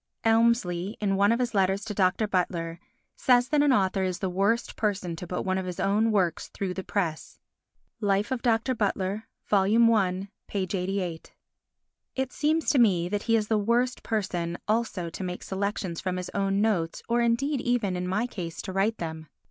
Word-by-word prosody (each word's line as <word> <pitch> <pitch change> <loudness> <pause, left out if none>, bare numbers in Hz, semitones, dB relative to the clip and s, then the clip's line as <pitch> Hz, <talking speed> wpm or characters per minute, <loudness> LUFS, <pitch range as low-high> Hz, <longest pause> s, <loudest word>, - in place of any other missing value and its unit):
Elmsley, 225 -5 +2
in 195 -2 +1
one 200 +2 +4
of 230 - +3
his 245 -1 -1
letters 195 +1 +1
to 215 - -4
Dr. 195 +2 +2
Butler, 170 -3 -1 0.4
says 245 -1 +3
that 300 -1 +3
an 290 -1 +4
author 195 -5 +2
is 185 -1 -1
the 185 0 -2
worst 200 +6 0
person 195 -5 -1
to 175 +2 -7
put 180 - -3
one 190 0 0
of 185 - -4
his 180 - -5
own 215 +3 +2
works 185 -6 +1
through 190 -2 -4
the 190 - -5
press 170 -7 -3 0.6
(Life 205 +2 +1
of 255 -2 -1
Dr. 235 +1 +2
Butler, 205 -1 -1 0.2
I, 200 -2 +3 0.3
88). 185 -3 -3 0.8
It 265 -1 -2
seems 315 +1 +1
to 275 - +3
me 180 -7 +3
that 205 +1 -1
he 230 - +5
is 215 -2 +1
the 220 -1 +2
worst 240 +4 +1
person 175 -6 -2
also 210 -6 -1
to 190 - -6
make 180 -1 -5
selections 190 -3 -3
from 185 -1 -2
his 180 - -5
own 195 0 +1
notes 185 -7 0
or 240 0 +2
indeed 245 +4 +1
even, 235 -6 0
in 180 0 -3
my 200 +6 0
case, 175 -9 -6
to 190 - -5
write 205 +4 +1
them. 160 -1 -6
200 Hz, 185 wpm, -27 LUFS, 185-230 Hz, 0.8 s, he